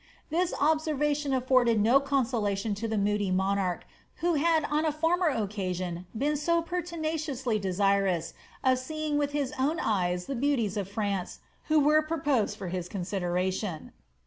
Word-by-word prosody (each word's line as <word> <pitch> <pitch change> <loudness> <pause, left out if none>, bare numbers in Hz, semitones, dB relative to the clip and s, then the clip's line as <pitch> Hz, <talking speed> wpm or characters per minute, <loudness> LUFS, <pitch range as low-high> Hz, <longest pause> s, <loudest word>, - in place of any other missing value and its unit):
This 350 +2 +1
observation 295 -1 +1
afforded 255 -3 +3
no 235 +6 +5
conso 270 -4 0
lation 205 +1 -1
to 225 +2 -3
the 220 -1 -1
moody 205 0 +1
monarch, 190 -1 0 0.3
who 345 +1 0
had 320 +1 +3
on 300 +1 0
a 315 - +2
former 330 +4 +1
occasion 185 - -2
been 290 +5 +1
so 335 +4 +2
' - - -8
pertinaciously 315 -8 -2
desirous 195 -3 +1 0.3
of 255 -1 +3
seeing 305 +2 -2
with 285 0 -1
his 285 -1 -1
own 295 +5 +1
eyes 180 -4 0
the 275 - -4
beauties 245 -6 0
of 200 -2 -3
France, 200 -3 -3 0.3
who 310 0 +4
were 300 +2 +5
proposed 285 -9 0
to 195 - -6
his 180 0 -4
consideration. 185 -1 -2
250 Hz, 155 wpm, -28 LUFS, 195-300 Hz, 0.3 s, no